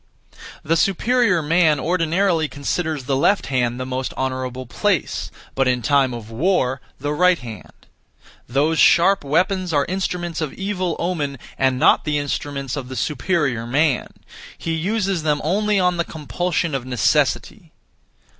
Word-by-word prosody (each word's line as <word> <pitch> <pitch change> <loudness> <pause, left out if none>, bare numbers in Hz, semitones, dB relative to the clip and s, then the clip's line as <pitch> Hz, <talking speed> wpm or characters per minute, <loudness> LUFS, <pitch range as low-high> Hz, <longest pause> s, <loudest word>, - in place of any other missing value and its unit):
The 165 - +1
superior 200 +1 +2
man 160 -1 +3
ordinarily 170 +1 +1
considers 150 +1 -3
the 135 +1 -1
left 185 +8 +2
hand 120 -1 0
the 130 - -3
most 130 0 -4
honourable 130 -1 -3
place, 115 - -1 0.2
but 135 -1 +1
in 125 -1 +1
time 140 -3 +3
of 115 -2 -8
war 130 -1 0 0.2
the 145 +2 -2
right 180 +3 +4
hand. 115 -6 -11 0.6
Those 150 +5 +1
sharp 190 +2 +5
weapons 180 +5 +1
are 145 -1 +2
instruments 175 -3 -3
of 155 -3 -3
evil 190 -3 -2
omen, 155 -6 -2 0.2
and 130 -1 +1
not - - +4
the 150 -1 0
instruments 140 -2 -3
of 135 -3 -5
the 130 - -6
superior 140 -5 -1
man; 145 +2 +1 0.5
he 165 - -4
uses 190 +2 -1
them 150 -1 +1
only 205 +5 +1
on 180 -1 +2
the 170 - +1
compulsion 165 +3 -2
of 135 -2 -2
necessity. 125 -4 0
150 Hz, 145 wpm, -21 LUFS, 130-180 Hz, 0.6 s, sharp